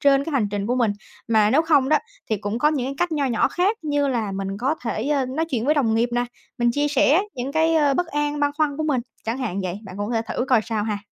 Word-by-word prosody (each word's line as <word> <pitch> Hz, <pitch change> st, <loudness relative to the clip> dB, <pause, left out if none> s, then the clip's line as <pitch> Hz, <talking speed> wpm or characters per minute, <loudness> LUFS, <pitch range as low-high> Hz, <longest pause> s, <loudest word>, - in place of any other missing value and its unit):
trên 280 Hz, -1 st, +4 dB
cái 325 Hz, -, -5 dB
hành 225 Hz, -7 st, +1 dB
trình 205 Hz, 0 st, -2 dB
của 245 Hz, -, +1 dB
mình. 235 Hz, -5 st, +2 dB, 0.4 s
Mà 215 Hz, -2 st, +4 dB
nếu 305 Hz, +6 st, +4 dB
không 290 Hz, -5 st, +3 dB
đó, 305 Hz, -, +4 dB, 0.3 s
thì 215 Hz, -, +2 dB
cũng 205 Hz, +3 st, -3 dB
có 295 Hz, -, +4 dB
những 275 Hz, -5 st, -1 dB
cái 275 Hz, -, -4 dB
cách 350 Hz, -2 st, 0 dB
nho 290 Hz, -2 st, 0 dB
nhỏ 235 Hz, -4 st, +2 dB
khác 390 Hz, +5 st, +1 dB
như 290 Hz, -2 st, 0 dB
là 225 Hz, -6 st, -1 dB
mình 195 Hz, +1 st, -4 dB
có 270 Hz, +6 st, +1 dB
thể, 230 Hz, +3 st, -2 dB
ơ, 275 Hz, -3 st, +1 dB
nói 295 Hz, +6 st, -1 dB
chuyện 240 Hz, -3 st, -1 dB
với 300 Hz, +2 st, +3 dB
đồng 230 Hz, -7 st, +2 dB
nghiệp 235 Hz, +2 st, +2 dB
nè, 245 Hz, 0 st, +1 dB, 0.3 s
mình 240 Hz, 0 st, +3 dB
chia 290 Hz, +2 st, +1 dB
sẻ 295 Hz, +5 st, +4 dB
những 255 Hz, +3 st, -4 dB
cái, 320 Hz, +1 st, +2 dB
ơ, 290 Hz, -3 st, +3 dB
bất 355 Hz, +2 st, 0 dB
an, 295 Hz, -1 st, -2 dB
băn 290 Hz, -, +2 dB
khoăn 295 Hz, -2 st, 0 dB
của 310 Hz, -, -2 dB
mình, 280 Hz, -5 st, +1 dB, 0.2 s
chẳng 230 Hz, +4 st, -2 dB
hạn 200 Hz, -7 st, -2 dB
vậy, 185 Hz, +2 st, -3 dB
bạn 190 Hz, -1 st, -9 dB
cũng 205 Hz, -, -2 dB
có -, -, -2 dB
thể 225 Hz, -, +1 dB
thử 250 Hz, -, -1 dB
coi 250 Hz, -4 st, +5 dB
sao 220 Hz, -3 st, -2 dB
ha. 210 Hz, -2 st, -2 dB
265 Hz, 290 wpm, -23 LUFS, 225-295 Hz, 0.4 s, coi